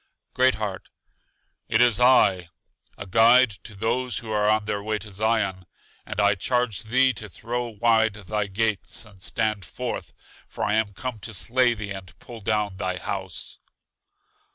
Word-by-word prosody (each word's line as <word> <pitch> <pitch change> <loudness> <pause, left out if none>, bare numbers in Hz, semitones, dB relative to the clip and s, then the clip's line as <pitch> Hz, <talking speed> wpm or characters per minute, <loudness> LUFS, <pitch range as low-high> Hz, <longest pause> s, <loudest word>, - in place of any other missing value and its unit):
Great 130 +1 +4
heart: 105 -4 -5 0.8
It 115 - +2
is 120 -2 +4
I, 100 -9 +4 0.5
a - - -7
guide 115 +5 +6
to 105 - -9
those 115 +2 -1
who 110 -1 -6
are 105 0 +2
on 110 0 +2
their 105 -1 -2
way 110 +1 -1
to 105 +1 -10
Zion. 100 -3 0 0.4
And - - -4
I 100 0 +5
charge 110 0 0
thee 130 +3 +3
to 105 -2 -7
throw 120 +5 -4
wide 110 -1 +2
thy 105 0 -2
gates 105 -1 -2
and 100 -3 -18
stand 110 -1 -1
forth, - - -5 0.4
for - - -5
I 105 - +1
am 110 -2 +1
come 125 +2 -5
to 110 +1 -6
slay 120 +4 +2
thee 105 -1 -6
and 95 -3 -9
pull 115 -2 -11
down 105 -2 -1
thy 95 0 -2
house. 95 -3 -4
110 Hz, 165 wpm, -25 LUFS, 100-115 Hz, 0.8 s, guide